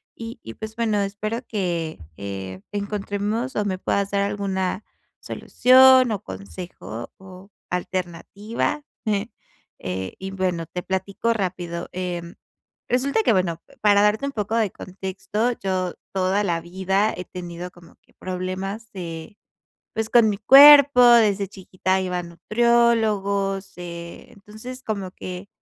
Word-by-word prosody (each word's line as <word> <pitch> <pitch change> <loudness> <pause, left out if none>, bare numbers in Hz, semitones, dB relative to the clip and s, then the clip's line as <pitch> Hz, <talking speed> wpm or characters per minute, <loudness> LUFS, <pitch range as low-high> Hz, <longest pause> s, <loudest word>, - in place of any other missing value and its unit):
Y 230 0 -8
y 115 - -8
pues, 220 0 -8
bueno, 220 -3 +1
espero 215 +4 -3
que, 175 - -2 0.2
eh, 95 -1 -6
encontremos, 205 +4 -3
o 210 - +1
me 190 -2 -1
puedas 200 +1 -1
dar 200 -1 +1
alguna 200 -1 -2 0.4
solución, 255 0 +5
o 205 - -3
consejo, 110 - -8
o 190 +1 -14 0.2
alternativa. 185 - -3 1.0
Eh, 95 0 -4
y 190 0 -5
bueno 185 -3 -1
te 180 - -5
platico 200 +4 -1
rápido. 175 -4 -4
Em, 175 -2 -4 0.5
resulta 275 - +2
que 230 - +4
bueno, 170 -4 0 0.2
para 205 -1 +5
darte 210 +5 +2
un 280 - -2
poco 215 -1 -2
de 220 -4 +1
contexto, 190 +5 -3
yo 185 -2 -1 0.2
toda 190 +2 +1
la 170 -3 0
vida 190 +4 0
he 180 - -6
tenido 175 0 -7
como 175 -1 -18
que - - -31
problemas 185 +4 -5
de, 170 0 -7 0.6
pues, 220 0 -1
con 235 -2 +6
mi 200 - -3
cuerpo 280 +2 +9
desde 215 -5 +5
chiquita 190 -1 -2
iba 180 -1 -2
a - - -6
nutriólogos, 200 -1 +1
eh, 170 -1 -8
entonces 215 +5 -10
como 200 -4 -3
que, 185 +2 -8
195 Hz, 135 wpm, -23 LUFS, 180-215 Hz, 1.0 s, cuerpo